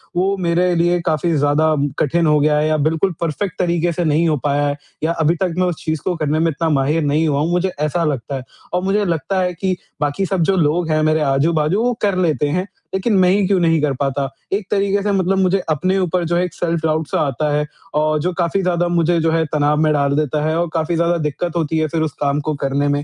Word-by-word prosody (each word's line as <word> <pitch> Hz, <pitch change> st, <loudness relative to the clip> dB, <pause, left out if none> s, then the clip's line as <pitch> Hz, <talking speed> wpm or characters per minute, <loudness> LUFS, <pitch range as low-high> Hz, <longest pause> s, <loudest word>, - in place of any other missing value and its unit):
वो 190 Hz, +3 st, +1 dB
मेरे 175 Hz, +1 st, +2 dB
लिए 175 Hz, +1 st, +2 dB
काफ़ी 165 Hz, +1 st, 0 dB
ज़्यादा 150 Hz, +2 st, +2 dB, 0.2 s
कठिन 170 Hz, +4 st, +1 dB
हो 150 Hz, -1 st, +4 dB
गया 150 Hz, +1 st, +2 dB
है 155 Hz, +1 st, +1 dB
या 155 Hz, 0 st, +1 dB
बिल्कुल 165 Hz, +4 st, +1 dB
परफेक्ट 170 Hz, +3 st, -3 dB
तरीक़े 175 Hz, -1 st, +1 dB
से 175 Hz, +1 st, -2 dB
नहीं 155 Hz, +2 st, +2 dB
हो 150 Hz, -, +1 dB
पाया 145 Hz, 0 st, +1 dB
है 145 Hz, 0 st, -2 dB, 0.3 s
या 160 Hz, -, +1 dB
अभी 160 Hz, +3 st, +3 dB
तक 175 Hz, 0 st, -1 dB
मैं 185 Hz, -, +2 dB
उस 175 Hz, -, -1 dB
चीज़ 155 Hz, -1 st, -2 dB
को 180 Hz, -, -1 dB
करने 155 Hz, -1 st, -1 dB
में 165 Hz, +1 st, +2 dB
इतना 160 Hz, +3 st, -1 dB
माहिर 150 Hz, +2 st, +1 dB
नहीं 150 Hz, +3 st, +1 dB
हुआ 140 Hz, -1 st, +1 dB
हूँ, 165 Hz, +3 st, 0 dB
मुझे 180 Hz, +1 st, 0 dB
ऐसा 155 Hz, +3 st, 0 dB
लगता 140 Hz, -3 st, -2 dB
है। 130 Hz, -, -5 dB, 0.3 s
और 180 Hz, +1 st, 0 dB
मुझे 205 Hz, +2 st, +1 dB
लगता 170 Hz, +3 st, -1 dB
है 180 Hz, -1 st, -1 dB
कि 185 Hz, +2 st, -1 dB, 0.3 s
बाक़ी 145 Hz, +7 st, 0 dB
सब 185 Hz, -1 st, -1 dB
जो 195 Hz, +3 st, +2 dB
लोग 165 Hz, +1 st, +1 dB
हैं 155 Hz, 0 st, +2 dB
मेरे 155 Hz, 0 st, +2 dB
आजू-बाजू 155 Hz, +7 st, +1 dB
वो 245 Hz, 0 st, +1 dB
कर 200 Hz, -3 st, +1 dB
लेते 155 Hz, -4 st, +1 dB
हैं, 180 Hz, +5 st, -1 dB, 0.3 s
लेकिन 190 Hz, +4 st, 0 dB
मैं 180 Hz, -1 st, +4 dB
ही 195 Hz, +1 st, +2 dB
क्यों 190 Hz, -1 st, +2 dB
नहीं 165 Hz, -2 st, +2 dB
कर 145 Hz, -2 st, +1 dB
पाता? 140 Hz, 0 st, -1 dB, 0.3 s
एक 195 Hz, -1 st, -1 dB
तरीके 200 Hz, 0 st, +1 dB
से 205 Hz, -, 0 dB
मतलब 190 Hz, 0 st, +1 dB
मुझे 190 Hz, +1 st, +2 dB
अपने 185 Hz, +5 st, +1 dB
ऊपर 180 Hz, -1 st, 0 dB
जो 170 Hz, +1 st, 0 dB
है 175 Hz, -, +2 dB
एक 175 Hz, -, -7 dB
सेल्फ 170 Hz, 0 st, -1 dB
डाउट 155 Hz, -1 st, 0 dB
सा -, -, -1 dB
आता 145 Hz, +3 st, -1 dB
है 150 Hz, 0 st, +1 dB, 0.3 s
और 155 Hz, 0 st, +2 dB
जो 180 Hz, +3 st, 0 dB
काफ़ी 175 Hz, +2 st, 0 dB
ज़्यादा 175 Hz, -1 st, 0 dB
मुझे 170 Hz, 0 st, +2 dB
जो 165 Hz, 0 st, +1 dB
है 165 Hz, 0 st, +2 dB
तनाव 150 Hz, 0 st, +2 dB
में 155 Hz, -, +3 dB
डाल 140 Hz, -1 st, +1 dB
देता 150 Hz, 0 st, 0 dB
है 155 Hz, +1 st, 0 dB
और 175 Hz, -, 0 dB
काफ़ी 165 Hz, +1 st, 0 dB
ज़्यादा 170 Hz, +1 st, +1 dB
दिक्कत 155 Hz, +3 st, -3 dB
होती 160 Hz, -1 st, -1 dB
है 155 Hz, 0 st, +1 dB
फिर 160 Hz, +1 st, -2 dB
उस 155 Hz, -2 st, -1 dB
काम 140 Hz, 0 st, +1 dB
को 155 Hz, -, +1 dB
करने 140 Hz, +1 st, 0 dB
में। 145 Hz, 0 st, 0 dB
165 Hz, 255 wpm, -18 LUFS, 150-180 Hz, 0.3 s, हो